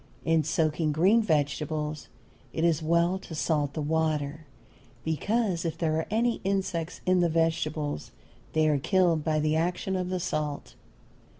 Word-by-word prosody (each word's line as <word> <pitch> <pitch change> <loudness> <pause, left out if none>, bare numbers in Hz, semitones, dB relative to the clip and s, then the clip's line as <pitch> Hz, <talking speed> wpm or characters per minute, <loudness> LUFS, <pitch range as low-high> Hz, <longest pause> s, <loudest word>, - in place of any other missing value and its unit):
In 165 -1 +3
soaking 155 0 0
green 190 +9 +4
vegetables 150 -3 -1 0.5
it 160 - -1
is 165 -2 +2
well 170 +3 +2
to 165 - -9
salt 150 -2 0
the 155 - -2
water, 155 -1 -1 0.6
because 185 - 0
if 165 -2 -3
there 155 -2 0
are 160 - -2
any 230 +3 +1
insects 185 -4 -2
in 185 0 +3
the 175 -1 +3
vegetables 155 - -1 0.4
they 155 0 +3
are 150 -2 +2
killed 175 -1 +2
by 155 -1 +1
the 155 +1 +1
action 180 +3 -1
of 180 -1 -2
the 185 0 -1
salt. 155 -4 -3
160 Hz, 155 wpm, -28 LUFS, 155-180 Hz, 0.6 s, green